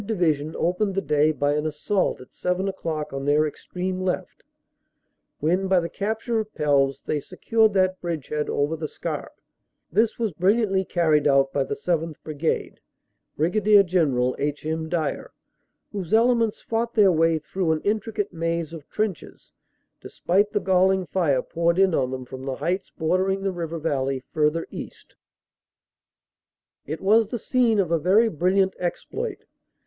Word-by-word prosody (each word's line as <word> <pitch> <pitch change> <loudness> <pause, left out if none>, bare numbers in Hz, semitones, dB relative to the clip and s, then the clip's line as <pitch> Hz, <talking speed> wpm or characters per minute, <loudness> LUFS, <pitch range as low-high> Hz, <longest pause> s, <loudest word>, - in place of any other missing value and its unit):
Division 160 -8 0
opened 185 +3 0
the 195 - +1
day 150 +1 +3
by 145 0 0
an 150 +1 0
assault 155 +5 -1
at 125 - -15
seven 180 +2 -1
o - - 0
clock 155 -5 -4
on 135 0 -4
their 145 +2 +3
extreme 185 +4 -4
left, 185 -1 -3 1.0
when 180 +6 +1
by 190 -1 +4
the 170 -1 -3
cap 220 +3 -3
ture 235 -2 0
of 215 -1 -4
Pelves 140 -2 +1
they 150 - -1
secured 220 +8 +1
that 185 -1 +2
bridgehead 150 -3 -3
over 145 +3 0
the 155 -1 -4
Scarpe. - - -6 0.5
This 220 +6 +2
was 225 -3 -1
brilliantly 195 +2 +2
carried 155 -5 +2
out 135 -1 +3
by 140 - +1
the - - -3
7th. 165 0 -1
Brigade, 155 +1 -2 0.6
Brig. 175 +8 +1 0.2
General 140 -9 +1
H. 145 +1 -2
M. 160 0 -2
Dyer, 165 -2 -2 0.6
whose 195 -1 -1
elements 230 -1 +2
fought 230 +1 -2
their 205 -4 +6
way 165 -1 +3
through 165 +2 -2
an 155 -1 0
intricate 210 -1 -2
maze 165 -1 -2
of 155 -4 -10
trenches, 210 -6 -4 0.5
despite 200 +4 0
the 205 - +1
galling 190 0 +2
fire 155 -9 +1
poured 170 +1 0
in 190 -2 +4
on 130 -4 +1
them 130 -1 -5
from 130 +1 -9
the 135 -1 -2
heights 185 +6 -2
bordering 185 +4 0
the 195 - 0
river 165 -1 -4
valley 135 -4 -1
further 155 +2 +1
east. - - -9 1.7
It 155 +3 -4
was 215 +3 +4
the 240 - -3
scene 235 -1 +2
of 185 -5 +1
a 165 - +3
very 205 +8 +4
brilliant 190 +3 +2
exploit. 430 - -4
175 Hz, 160 wpm, -24 LUFS, 150-195 Hz, 1.7 s, their